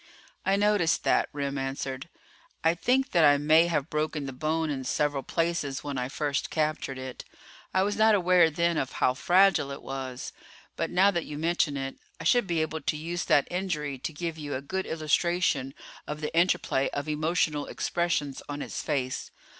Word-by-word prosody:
"I 195 - +4
noticed 205 -5 +2
that," - - +2
Remm 140 -1 -3
answered. 135 +2 -4 0.5
"I 165 +1 +4
think 255 +9 +1
that 170 -3 +4
I 145 -1 +6
may 155 +3 +5
have 155 -3 -1
broken 150 -1 -1
the 135 - -5
bone 155 +3 -1
in 135 -2 -3
several 145 +2 0
places 165 -4 -1
when 140 -3 -3
I 125 0 -2
first 145 0 -2
captured 155 -4 -1
it. 130 -1 -7 0.5
I 190 - +2
was 205 +1 0
not 220 0 +5
aware 180 -3 +5
then 170 +1 +1
of 135 - -2
how 125 - +2
fragile 180 +1 +4
it 140 - -7
was. 130 -2 -5 0.4
But - - -2
now 195 +3 +4
that 170 -3 -2
you 145 - -6
mention 160 -2 +1
it, 135 0 -5 0.2
I - - -6
should 245 -5 +3
be 165 -3 +1
able 160 0 -4
to 150 - -1
use 170 +3 -3
that 145 - +3
injury 155 -7 -2
to 145 - -4
give 160 +1 -5
you 145 -2 -4
a 130 - -3
good 190 +6 -3
illustration 155 -3 0 0.3
of 150 0 -4
the 150 +1 -4
interplay 170 -5 +2
of 145 +1 -4
emotional 155 -1 0
expressions 165 -6 -1
on 145 0 -4
its - - -5
face. 135 -4 -2
155 Hz, 185 wpm, -28 LUFS, 140-170 Hz, 0.5 s, I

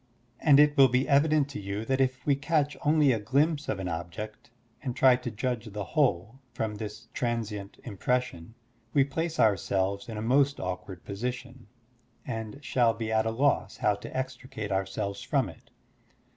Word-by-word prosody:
And 145 -3 +6
it 150 0 +5
will 135 -1 +8
be 125 +2 +1
evident 150 0 +4
to - - -6
you 100 +2 -4
that 130 +2 +1
if 130 -1 0
we 145 - +4
catch 150 +1 0
only 150 -2 +4
a 115 - +1
glimpse 145 +8 +1
of - - 0
an 95 -1 -4
object 90 +7 -6 0.3
and 125 -4 -4
try 130 -1 +6
to 125 -1 -5
judge 120 +1 -3
the 105 0 -4
whole 125 - +1 0.2
from 110 -3 -2
this 105 +2 -7
transient 110 -5 -3
impression, 115 -3 -2 0.4
we 140 - +6
place 160 +4 -3
ourselves 100 0 +1
in 110 - -5
a - - -3
most 140 +4 +3
awkward 90 0 -5
position, 125 +3 -5 0.6
and 115 +2 -6
shall 120 -3 +2
be 110 -1 -3
at 110 0 +2
a - - +2
loss 135 +5 +1
how 105 - +2
to 100 - -7
extricate 130 -4 -5
ourselves 95 +1 -2
from - - +1
it. - - -14
120 Hz, 170 wpm, -28 LUFS, 105-135 Hz, 0.6 s, will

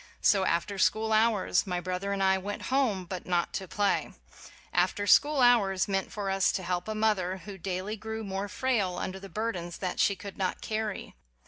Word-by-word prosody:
So, 195 -3 +4
after 190 +4 -1
school 220 +3 +2
hours, 215 -3 +2
my 180 -1 -1
brother 185 +2 -3
and 195 -1 0
I 190 0 +4
went 205 +2 -5
home, 225 -9 +1
but 180 0 -6
not 175 -1 0
to 190 - -4
play. 205 +2 0 0.6
Af - - +2
ter 205 - -2
school 290 +7 +5
hours 210 -6 +4
meant 195 -1 -1
for 200 -2 -3
us 195 0 +3
to 190 - -2
help 180 +1 -2
a 215 - -3
mother 200 -4 +1
who 205 -2 -7
daily 190 +3 -4
grew 220 +1 -5
more 195 0 -3
frail 210 -5 0
under 190 +1 -4
the 195 0 -10
burdens 190 -6 -3
that 185 -2 -3
she 200 - +3
could 200 +1 -9
not 185 -1 -1
carry. 215 -2 -4
195 Hz, 200 wpm, -29 LUFS, 185-215 Hz, 0.6 s, school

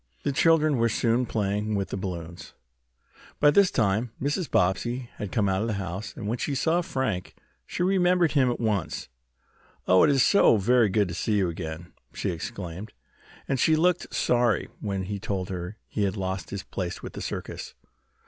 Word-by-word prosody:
The - - 0
children 155 0 +3
were 115 0 +2
soon 115 +2 +1
playing 105 0 -1
with 100 -1 -2
the - - -3
balloons. 90 -3 -6 0.8
By 145 - +6
this 200 +3 +5
time 110 +1 0
Mrs. 145 +5 -1
Bobbsey 120 +7 0
had 105 - -5
come 105 -4 +1
out 95 0 +1
of 110 - -1
the 110 - -1
house, 95 +2 -5
and 105 - -5
when 115 +3 -2
she 140 - -1
saw 165 +6 +2
Frank 130 - -3 0.3
she 175 - -2
remembered 180 -3 +3
him 135 -4 +3
at 120 - -2
once. 105 -7 -2 0.8
"Oh, 90 0 +6
it - - +5
is 135 -2 +4 0.4
very 120 0 +4
good 100 +1 +2
to - - -5
see 105 +6 -1
you 100 -4 +2
again," 80 0 -6 0.2
she - - -2
exclaimed, 90 +4 -6 0.5
and 135 - 0
she 160 +6 +4
looked 175 +2 +1
sorry 120 -3 +1
when 100 -2 -3
he 100 +2 -4
told 95 -3 -3
her 90 +2 -5
he 105 - -3
had 100 +1 0
lost 95 -2 -3
his 100 -1 -5
place 95 -3 -5
with - - -7
the - - -7
circus. - - -6
105 Hz, 185 wpm, -26 LUFS, 95-130 Hz, 0.8 s, By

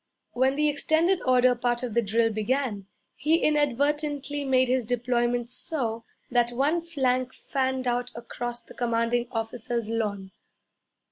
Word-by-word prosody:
When 260 +2 +2
the 300 +1 +2
extended 315 +5 +2
order 255 0 +5
part 240 0 -1
of 240 -3 -3
the 235 - +3
drill 225 +1 +1
began, 215 -2 -1 0.3
he 305 +5 +2
inadvertently 290 0 0
made 260 -1 +3
his 255 0 +1
deployment 240 0 0
so 230 -8 -2 0.3
that 240 -1 +3
one 285 +7 +1
flank 255 -6 -1
fanned 260 -1 -2
out 245 0 0
across 240 0 -5
the - - -14
commanding 235 0 0
officer's 225 -1 -3
lawn. 200 -4 -2
245 Hz, 135 wpm, -26 LUFS, 235-275 Hz, 0.3 s, order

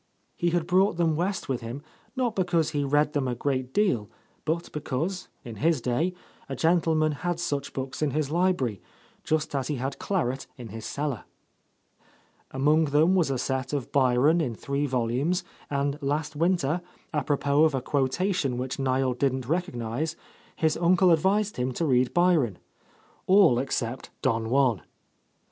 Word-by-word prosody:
He 175 - +1
had 170 -1 0
brought 185 +1 +3
them 165 -2 +2
West 180 +4 -2
with 130 -3 -2
him, 120 +5 -6 0.3
not 250 -4 0
because 175 -4 +1
he 145 -2 0
read 145 +2 +2
them 140 -3 0
a 125 - -1
great 130 0 -2
deal, 130 - +1 0.4
but 165 +2 -2
because, 155 +5 -3 0.2
in 115 -3 -7
his 160 +6 +2
day, 140 +10 0 0.3
a 135 - -3
gentleman 160 0 +2
had 170 +3 -3
such 145 -5 -2
books 130 +1 -5
in 150 - +2
his 150 +1 -1
library, 165 - +1 0.4
just 155 -1 -1
as 135 -2 -1
he 150 - -1
had 135 +2 -4
claret 135 -9 -1
in 120 -3 -8
his 110 +2 -7
cellar. 140 -6 -3 1.2
Among 150 +4 +3
them 150 +5 +3
was 175 -6 +2
a 135 - 0
set 130 +1 -2
of 140 -4 -3
Byron 140 +5 +3
in 125 -7 -2
three 140 +5 -2
volumes, 130 +8 0 0.3
and 140 +1 -1
last 145 +2 -2
winter, 170 0 +1 0.3
apropos 145 0 +2
of 155 -3 +1
a - - +1
quotation 140 0 0
which 130 +2 -4
Niel 130 -1 +1
didn't 130 -1 -1
recognize, 155 -2 -2 0.4
his 160 -1 +1
uncle 180 +2 +4
advised 195 +6 +2
him 125 +1 -1
to 165 - -1
read 130 -3 +2
Byron, 165 - +2 0.4
— - - -33
all 185 -10 +6
except 125 -1 -3
"Don 115 -1 0
Juan." 125 - +2
145 Hz, 160 wpm, -27 LUFS, 130-170 Hz, 1.2 s, all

